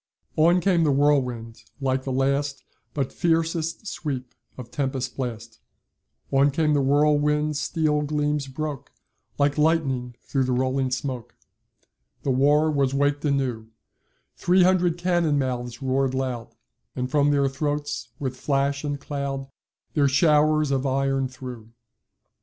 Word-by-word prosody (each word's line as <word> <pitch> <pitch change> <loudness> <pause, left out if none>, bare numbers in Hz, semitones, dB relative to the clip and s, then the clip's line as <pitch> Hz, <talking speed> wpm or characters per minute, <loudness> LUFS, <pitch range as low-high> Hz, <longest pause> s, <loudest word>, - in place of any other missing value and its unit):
["On 170 +3 +4
came 175 -2 +3
the 155 - +3
whirlwind 125 -6 +1 0.2
like 130 -1 -1
the 135 - -2
last 140 +2 0 0.3
But 140 -3 -2
fiercest 165 +1 0
sweep 135 - -4 0.2
of 125 -2 -9
tempest 135 -2 -2
blast 120 -4 -5 0.7
On 140 +1 +4
came 150 +2 +1
the 145 - +3
whirlwind 150 +2 +2
steel 150 0 0
gleams 150 -1 -1
broke 145 0 -5 0.5
Like 145 +1 +1
lightning 135 -6 +1
through 135 -2 0
the 130 - 0
rolling 130 +1 0
smoke; 130 -2 -4 0.9
The 135 - +1
war 145 +4 +3
was 140 -2 +1
waked 145 +1 +1
anew, 130 -6 -1 0.7
Three 180 +1 +3
hundred 180 -2 +3
cannon 175 -4 +1
mouths 125 -2 -3
roar'd 130 0 +1
loud, 125 -3 -3 0.4
And 125 0 -3
from 145 -1 +3
their 140 -1 +3
throats, 145 +2 -3
with 130 -2 -3
flash 140 +1 0
and 145 -1 -3
cloud, 140 -1 -4 0.4
Their 145 -2 +3
showers 150 +1 +3
of 135 -1 +1
iron 135 0 +1
threw. 125 -3 -10
140 Hz, 135 wpm, -24 LUFS, 130-150 Hz, 0.9 s, On